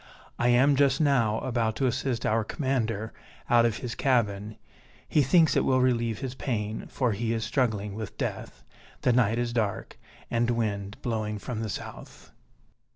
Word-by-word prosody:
I 120 - +2
am 130 +4 +5
just 135 0 +3
now 125 -8 +2
about 115 -4 -1
to 135 - 0
assist 125 -2 -1
our 110 +1 +2
commander 115 -3 -2 0.4
out 120 -1 +6
of 115 -1 -2
his 120 -2 -5
cabin; 110 -5 0 0.5
he 150 - +3
thinks 160 +4 +4
it - - +3
will 130 -1 +3
relieve 120 -3 +1
his 130 -2 -4
pain, 110 -5 -3
for 125 -3 0
he 115 +2 -1
is 115 -1 -2
struggling 110 -6 0
with 110 0 -7
death. - - -5 0.4
The 125 - +3
night 115 -2 +3
is 120 -1 -1
dark, 110 -1 -2 0.3
and 120 0 +1
wind 105 -4 -2
blowing 110 -3 -2
from 115 +2 -5
the 110 -1 -3
south." - - -8
115 Hz, 165 wpm, -27 LUFS, 110-130 Hz, 0.5 s, out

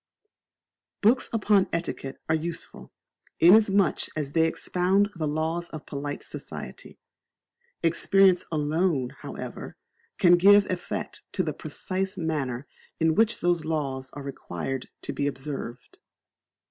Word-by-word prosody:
Books 240 +5 +3
upon 210 -3 +3
Etiquette 165 -5 -3
are 160 - +2
useful, 165 +1 -4 0.5
inasmuch 195 0 +5
as 145 -3 -3
they 160 +1 +3
expound 185 +5 +1
the 160 -3 -2
laws 160 +3 -1
of 155 - -8
polite 145 0 -5
society. - - -8 0.9
Experience 185 +2 +4
alone, 150 -3 0
however, - - -7 0.4
can 175 -1 +6
give 200 +3 +7
effect 180 - -4
to - - +1
the - - -2
precise 190 +1 -4
manner 145 -6 -2 0.3
in 160 -1 +3
which 225 +5 +2
those 175 -2 +2
laws 140 -4 -2
are 145 - -7
required 135 -1 -5
to - - -4
be 145 - -1
observed. 135 -3 -6
165 Hz, 120 wpm, -26 LUFS, 145-190 Hz, 0.9 s, give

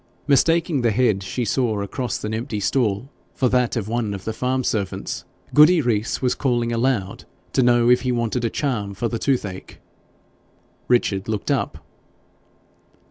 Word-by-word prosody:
Mistaking 160 +1 +3
the 120 - +2
head 110 -3 +2
she 120 +5 -3
saw 110 -1 0
across 120 +2 -4
an 105 - -3
empty 115 -1 -3
stall 110 +2 0 0.2
for 130 - +2
that 125 -1 +1
of 110 -4 -2
one 110 -3 -1
of 95 - -8
the 110 - -2
farm 130 +3 -1
servants, 100 -5 -3 0.3
Goody 155 +4 +7
Rees 115 -3 -1
was 125 -1 +2
calling 120 -2 0
aloud 115 -5 -1 0.3
to 130 - +3
know 120 -1 +4
if 125 +1 +5
he 130 - -1
wanted 120 0 -1
a 115 - +1
charm 105 -8 -2
for 120 +4 -1
the 115 0 -3
toothache. 105 -9 -2 1.1
Richard 100 -6 +1
looked 105 -2 -2
up. - - -2
120 Hz, 160 wpm, -22 LUFS, 105-130 Hz, 1.1 s, Goody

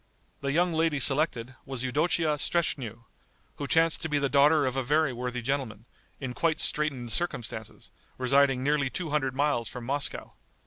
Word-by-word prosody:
The 140 0 -2
young 175 +3 +2
lady 160 -2 +1
selected, 135 -3 +1
was 135 -2 -5
Eudocia 155 +4 +1
Streschnew, 125 -10 -1 0.5
who 145 - -4
chanced 165 +2 +3
to 160 - -3
be 150 - +1
the 140 -1 0
daughter 145 +1 +4
of 130 0 -1
a 135 - 0
very 145 +1 +1
worthy 125 0 -4
gentleman, 120 -5 -3 0.3
in 130 -3 -5
quite 160 +4 0
straitened 135 -6 0
circumstances, 110 -7 -4 0.3
residing 135 0 +3
nearly 145 -1 +1
two 165 +2 -4
hundred 135 -3 0
miles 140 -5 0
from 125 -2 -8
Moscow. 140 +3 -2
140 Hz, 165 wpm, -28 LUFS, 125-150 Hz, 0.5 s, daughter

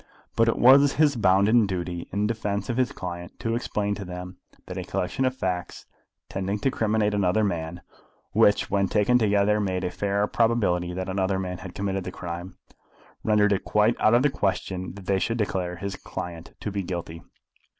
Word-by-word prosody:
But 115 - +3
it 115 - +2
was 135 +3 +7
his 150 -2 +3
bounden 105 +2 +4
duty 90 -2 -4
in 100 +2 0
defence 105 -2 -2
of 120 - -3
his 130 -1 +2
client 85 -1 -7
to 115 - -1
explain 105 -3 -1
to 100 - -5
them 90 0 -7 0.3
that - - -7
a - - -3
collection 90 +9 -2
of 130 0 0
facts 90 -7 -3 0.4
tending 95 +2 -2
to 135 - +2
criminate 110 -2 +1
another 100 +1 +2
man, 85 -3 -2 0.5
which 105 - +3
when 100 -1 +2
taken 115 +6 +3
together 105 -1 +3
made 95 -2 -1
a 90 - -1
fair 100 +2 0
probability 105 -7 +1
that 95 0 -3
another 95 0 0
man 90 -1 -4
had 95 -1 -9
committed 95 -1 -2
the 90 - -5
crime, 85 +1 -7 0.7
rendered 105 -1 +3
it 95 - -1
quite 105 +3 +2
out 110 +2 +5
of 120 - +4
the 145 - +3
question 95 -4 -2
that 100 -2 -11
they 95 0 +1
should 115 +4 -1
declare 95 -5 -1
his 95 +3 -5
client 85 -2 -7
to 105 - -3
be 100 0 -2
guilty. 85 -2 -5
100 Hz, 190 wpm, -25 LUFS, 90-110 Hz, 0.7 s, was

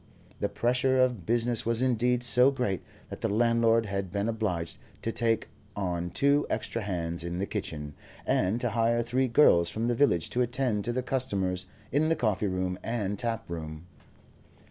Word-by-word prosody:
The - - 0
pressure 125 +2 +1
of 125 -9 +1
business 120 0 +1
was 115 0 +1
indeed 125 0 +1
so 125 +2 +5
great 125 -9 -1 0.3
that - - -7
the - - 0
landlord 115 +1 +3
had 100 -2 -3
been 100 +3 -1
obliged 95 -8 -2 0.2
to 115 - -1
take 115 -1 0 0.3
on 90 -3 -2
two 140 +7 +2
extra 115 - -2
hands 85 -4 -3
in 85 0 -4
the 95 - -1
kitchen, 75 -8 -5 0.3
and 100 +6 +1
to 120 - 0
hire 115 +1 +2
three 130 +3 +1
girls 100 - +5
from 110 +6 -2
the 120 - +2
village 100 - +2
to 125 - +1
attend 120 -4 0
to 120 - 0
the 125 +1 -2
customers 100 -9 -1 0.2
in 150 +4 +2
the 165 - +3
coffee 110 -7 0
room 95 -1 -2
and 105 -4 -2
tap 115 -2 -2
room. 80 -1 -6
115 Hz, 175 wpm, -28 LUFS, 95-125 Hz, 0.3 s, so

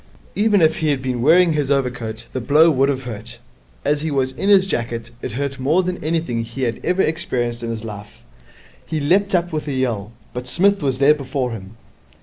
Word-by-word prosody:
Even 205 -3 +3
if 160 0 +3
he 160 - -1
had 145 -3 +1
been 125 -2 -2
wearing 165 +5 +5
his 145 -3 -1
overcoat, 125 -5 -1
the 130 - -2
blow 155 +6 +5
would 135 -1 +2
have 135 -1 -2
hurt. 115 0 -7 0.5
As 145 0 +1
he 160 - -2
was 135 -2 0
in 195 +9 -2
his 195 -2 +6
jacket 115 -7 -3
it - - -5
hurt 140 +1 -3
more 155 +8 +2
than 180 -2 -4
anything 155 -7 -1
he 120 +4 -6
had 120 -2 -1
ever 180 +2 +2
experienced 120 -7 -1
in 115 - -4
his 115 -1 -4
life. 105 -2 -9 0.6
He 160 - -3
leapt 190 +7 +2
up 175 -1 0
with 155 -1 -3
a 145 - -2
yell, 115 -6 -2 0.2
but 125 0 -5
Psmith 200 +8 +2
was 135 -3 0
there 140 +2 +5
before 135 -3 -3
him. 105 -1 -9
135 Hz, 210 wpm, -20 LUFS, 120-160 Hz, 0.6 s, his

